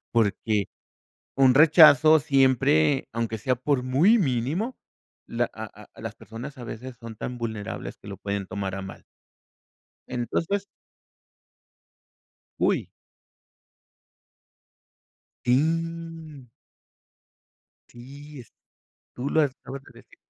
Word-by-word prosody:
Porque, 105 Hz, -2 st, +1 dB, 0.7 s
un 130 Hz, -2 st, +5 dB
rechazo 155 Hz, 0 st, +7 dB
siempre, 135 Hz, -, +3 dB
aunque 115 Hz, -1 st, -2 dB
sea 130 Hz, +4 st, 0 dB
por 130 Hz, +1 st, 0 dB
muy 155 Hz, -, +4 dB
mínimo, 160 Hz, -, -1 dB, 0.5 s
la -, -, -1 dB
a -, -, -6 dB, 0.3 s
a -, -, -13 dB
las -, -, -5 dB
personas 125 Hz, +6 st, -9 dB
a 125 Hz, -, -8 dB
veces 120 Hz, +2 st, -8 dB
son 115 Hz, -2 st, -9 dB
tan 125 Hz, +3 st, -6 dB
vulnerables 110 Hz, -3 st, -5 dB
que -, -, -18 dB
lo 100 Hz, -, -7 dB
pueden 100 Hz, -1 st, -3 dB
tomar 95 Hz, 0 st, -4 dB
a 95 Hz, -, -5 dB
mal. 95 Hz, -, -10 dB, 1.0 s
Entonces 165 Hz, +11 st, -2 dB, 2.0 s
¡Uy! -, -, +1 dB, 2.6 s
Y 160 Hz, 0 st, -1 dB, 1.4 s
Sí 140 Hz, +4 st, -12 dB
es 115 Hz, -, -19 dB, 0.6 s
tú 125 Hz, +3 st, -3 dB
las 155 Hz, -3 st, +3 dB
acabas 135 Hz, +1 st, -10 dB
de -, -, -17 dB
decir. -, -, -22 dB
130 Hz, 105 wpm, -25 LUFS, 115-150 Hz, 2.6 s, rechazo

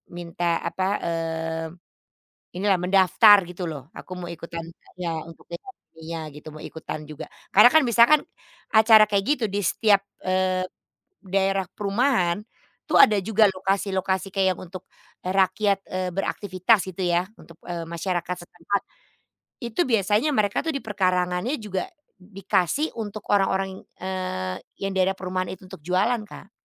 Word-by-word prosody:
minta, 170 Hz, 0 st, -2 dB
apa, 190 Hz, -, -2 dB, 0.2 s
eee, 165 Hz, -1 st, -2 dB, 0.9 s
inilah, 195 Hz, -1 st, +2 dB
mendaftar 195 Hz, +2 st, +6 dB
gitu 180 Hz, 0 st, -5 dB
loh, 150 Hz, 0 st, -8 dB
aku -, -, -12 dB
mau -, -, -6 dB
ikutan, 170 Hz, 0 st, -7 dB
e -, -, -26 dB
iya, 165 Hz, -2 st, -2 dB
untuk 165 Hz, -, -14 dB
dekorasinya 165 Hz, -, -9 dB
gitu, 150 Hz, +2 st, -11 dB
mau 155 Hz, 0 st, -10 dB
ikutan 160 Hz, -1 st, -6 dB
juga. 150 Hz, -1 st, -8 dB, 0.3 s
Karena 210 Hz, +5 st, +9 dB
kan, 315 Hz, -, +6 dB
misalkan, 240 Hz, +5 st, +5 dB, 0.5 s
acara 220 Hz, 0 st, +7 dB
kayak 200 Hz, -2 st, 0 dB
gitu 245 Hz, -, -3 dB
di 205 Hz, -, 0 dB
setiap, 205 Hz, +2 st, +3 dB, 0.2 s
eee, 185 Hz, 0 st, +1 dB, 0.6 s
daerah 195 Hz, 0 st, 0 dB
perumahan, 205 Hz, -3 st, +1 dB, 0.5 s
tuh -, -, +2 dB
ada 210 Hz, -2 st, +1 dB
juga 220 Hz, +2 st, +3 dB
lokasi-lokasi 190 Hz, 0 st, -1 dB
kayak 190 Hz, -2 st, +2 dB
yang -, -, -11 dB
untuk, 185 Hz, +1 st, -10 dB, 0.3 s
e -, -, -6 dB
rakyat, 195 Hz, +2 st, +2 dB
eee 185 Hz, 0 st, -1 dB
beraktivitas 195 Hz, +1 st, +1 dB
gitu 185 Hz, +1 st, -4 dB
ya, 175 Hz, +1 st, +1 dB
untuk, 165 Hz, -, -16 dB
eee, 170 Hz, -1 st, -4 dB
masyarakat 175 Hz, +1 st, -3 dB
setempat. 185 Hz, +4 st, -2 dB, 0.8 s
Itu 235 Hz, +6 st, -1 dB
biasanya 225 Hz, +4 st, +2 dB
mereka 210 Hz, -6 st, +1 dB
tuh 325 Hz, -, -1 dB
di 275 Hz, -, -3 dB
perkarangannya 185 Hz, +4 st, 0 dB
juga 195 Hz, -3 st, -3 dB, 0.3 s
dikasih 195 Hz, -, -1 dB
untuk 215 Hz, -1 st, -5 dB
orang-orang 195 Hz, -1 st, +2 dB
yang, -, -, -15 dB, 0.2 s
eee, 185 Hz, -, -3 dB, 0.3 s
yang 195 Hz, 0 st, -1 dB
daerah 190 Hz, +1 st, +2 dB
perumahan 185 Hz, 0 st, -3 dB
itu -, -, -26 dB
untuk 190 Hz, -, -9 dB
jualan, 200 Hz, +6 st, +2 dB
Kak. 200 Hz, -, -12 dB
190 Hz, 145 wpm, -24 LUFS, 175-205 Hz, 0.9 s, Karena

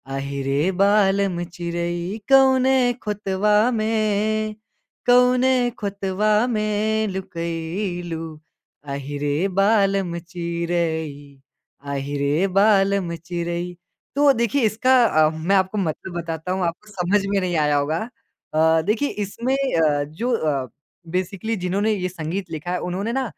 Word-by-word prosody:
अहि 140 Hz, 0 st, -4 dB
रे 150 Hz, +7 st, +1 dB
बालम 195 Hz, -3 st, +2 dB
चिरई 175 Hz, +3 st, -3 dB
कौने 265 Hz, -1 st, +5 dB, 0.3 s
खुतवा 210 Hz, 0 st, 0 dB, 0.2 s
में, 215 Hz, 0 st, 0 dB, 0.5 s
कौने 250 Hz, +1 st, +5 dB, 0.2 s
खुतवा 200 Hz, 0 st, -1 dB, 0.2 s
में 215 Hz, +1 st, 0 dB
लुकई 175 Hz, +1 st, -4 dB
लू, 160 Hz, -1 st, -6 dB, 0.4 s
अहि 140 Hz, 0 st, -5 dB
रे 145 Hz, 0 st, 0 dB, 0.3 s
बालम 195 Hz, -4 st, +2 dB
चिरई, 165 Hz, -5 st, -3 dB, 0.4 s
अहि 140 Hz, 0 st, -3 dB
रे 155 Hz, +7 st, +2 dB
बालम 195 Hz, -4 st, +3 dB
चिरई। 175 Hz, +1 st, -4 dB, 0.4 s
तो 285 Hz, 0 st, +5 dB
देखिए, 235 Hz, +4 st, 0 dB
इसका 250 Hz, +4 st, +4 dB
अ, 155 Hz, -6 st, +4 dB
मैं 160 Hz, +5 st, 0 dB
आपको 190 Hz, +2 st, +1 dB
मतलब 175 Hz, 0 st, -3 dB
बताता 165 Hz, +2 st, -5 dB
हूँ 185 Hz, -1 st, 0 dB
आपको 180 Hz, +6 st, -6 dB
समझ 195 Hz, +2 st, +1 dB
में 200 Hz, 0 st, +1 dB
नहीं 180 Hz, -2 st, -1 dB
आया 150 Hz, -1 st, +2 dB
होगा। 160 Hz, +11 st, -1 dB, 0.4 s
अ, 160 Hz, +1 st, +4 dB
देखिए 225 Hz, +7 st, +1 dB
इसमें 235 Hz, +7 st, -2 dB
अ, 160 Hz, -, +1 dB
जो 160 Hz, -, -3 dB
अ, 140 Hz, -, -1 dB, 0.4 s
बेसिकली 185 Hz, +5 st, -2 dB
जिन्होंने 195 Hz, +4 st, 0 dB
ये 185 Hz, -3 st, -1 dB
संगीत 175 Hz, +2 st, -5 dB
लिखा 160 Hz, +3 st, -5 dB
है 180 Hz, -, -1 dB
उन्होंने 195 Hz, +6 st, -2 dB
ना 265 Hz, 0 st, 0 dB
185 Hz, 125 wpm, -22 LUFS, 165-215 Hz, 0.5 s, कौने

